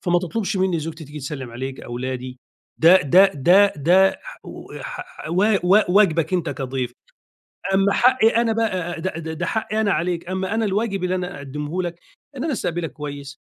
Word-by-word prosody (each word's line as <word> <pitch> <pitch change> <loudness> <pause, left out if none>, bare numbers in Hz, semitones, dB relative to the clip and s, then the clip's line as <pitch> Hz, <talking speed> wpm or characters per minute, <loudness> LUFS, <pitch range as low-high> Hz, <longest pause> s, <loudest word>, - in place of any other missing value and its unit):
فما 175 -1 +2
تطلبش 190 +3 -3
منّي 185 -2 +1
زوجتي 160 +1 -7
تيجي 150 +1 -9
تسلّم 135 -2 -6
عليك، 130 +3 -6
أولادي 125 +1 -5 0.4
ده 180 +3 +6
ده 180 +6 +6
ده 185 +8 +5
ده 180 +6 +3 0.6
ح - - -6 0.2
ح - - -5
و 185 +4 +2 0.2
و 190 +4 +6
واجبك 180 -4 +3
أنت 175 - -1
كضيف، 130 -3 -4 0.8
أمّا 195 +1 +3
حقّي 250 -2 +4
أنا 230 0 +1
ب 225 - -7 0.4
د 185 - -2 0.2
د 160 -1 -5
ده 175 - -2
حقّي 220 0 -1
أنا 205 - +1
عليك، 170 +1 -2
أمّا 190 +2 -2
أنا 225 0 +1
الواجب 200 -1 -1
اللي 180 0 0
أنا 180 -4 -4
أقدّمه 150 +6 -4
لك 175 0 -5 0.4
إن 255 - -3
أنا 310 - -1
أستقبلك 175 -7 -3
كويس، 145 -1 -8
175 Hz, 175 wpm, -22 LUFS, 145-195 Hz, 0.8 s, ده